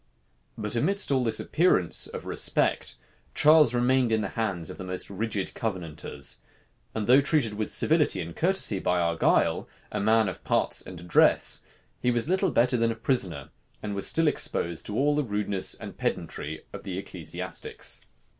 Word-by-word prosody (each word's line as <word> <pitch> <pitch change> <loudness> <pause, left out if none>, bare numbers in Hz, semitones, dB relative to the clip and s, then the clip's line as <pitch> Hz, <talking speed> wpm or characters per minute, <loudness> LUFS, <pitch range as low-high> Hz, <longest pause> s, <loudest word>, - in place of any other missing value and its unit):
But 105 +2 -1
amidst 185 - +1
all 130 -2 +2
this 110 -2 +2
appearance 155 - +2
of - - -8
respect, - - 0 0.4
Charles 150 -5 +5
remained 125 0 +2
in 110 -1 +2
the 100 - -3
hands 95 -8 -3
of - - -11
the - - -5
most 90 +1 -5
rigid 100 -1 -3
Covenanters; 85 -8 -4 0.5
and 110 -2 -2
though 130 +5 +6
treated 140 -6 +1
with 105 0 -3
civility 155 - +2
and 85 -2 -6
courtesy 175 - +3
by 90 -1 0
Argyle, 85 -1 +1 0.2
a - - -2
man 110 +1 +3
of 95 - -6
parts - - +1
and 90 -2 -10
address, 85 0 +4 0.4
he 125 - 0
was 120 +2 +1
little 190 +2 +1
better 125 -2 +3
than 115 0 +1
a - - -4
prisoner, 100 - -2 0.3
and 105 -1 -3
was 100 - -1
still 165 -1 +3
exposed 85 - -1
to 105 - -4
all 145 +2 +2
the 150 - +1
rudeness 105 -4 -2
and - - -10
pedantry 80 +1 -4
of - - -7
the - - -5
ecclesiastics. - - -4
110 Hz, 170 wpm, -27 LUFS, 95-130 Hz, 0.5 s, though